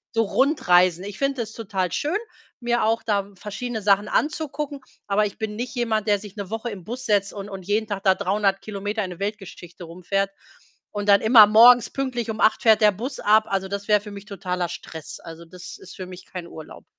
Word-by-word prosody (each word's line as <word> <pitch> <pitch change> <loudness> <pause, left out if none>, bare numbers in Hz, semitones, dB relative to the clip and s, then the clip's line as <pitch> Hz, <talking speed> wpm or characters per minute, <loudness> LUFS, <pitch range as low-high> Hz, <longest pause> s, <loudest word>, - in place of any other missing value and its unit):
so 225 - +3
Rundreisen. 185 - +3
Ich 205 -1 -7
finde 275 -3 -1
es 220 0 -6
total 190 -5 -3
schön, 315 +8 -1 0.4
mir 240 0 0
auch 225 +1 +1
da 200 -2 -1
verschiedene 220 +3 -5
Sachen 200 +1 +3
anzugucken, 300 -1 -2 0.3
aber 205 +1 +2
ich 200 - -7
bin 215 -1 -4
nicht 245 +2 -5
jemand, 220 -3 -1
der 205 -1 +3
sich 205 -1 -11
'ne 200 -3 -6
Woche 225 +2 -3
im 195 -5 -8
Bus 250 +6 -7
setzt 200 -1 +1
und 200 0 -7
und 190 -2 -8
jeden 215 +2 0
Tag 200 -1 -4
da 190 -1 +5
300 200 0 0
Kilometer 205 +1 -4
in 185 - -5
'ne 175 - -10
Weltgeschichte 195 -4 -7
rumfährt. 190 +4 -2 0.6
Und 205 0 -3
dann 200 - +6
immer 220 -2 +8
morgens 235 +2 +7
pünktlich 250 -4 -3
um 215 - -4
8:00 215 - +3
fährt 220 -2 +5
der 210 -1 +6
Bus 235 +8 -6
ab. 215 +1 +4
Also, 195 -1 -1
das 200 +1 -5
wär 210 -1 +4
für 210 -1 -10
mich 200 0 -10
totaler 180 -3 -3
Stress. 160 -2 -9
Also, 165 0 -11
das 180 +2 -11
ist 185 - -13
für 185 - -7
mich 180 0 -11
kein 180 -2 -7
Urlaub. 160 -2 -11
205 Hz, 215 wpm, -23 LUFS, 195-225 Hz, 0.6 s, immer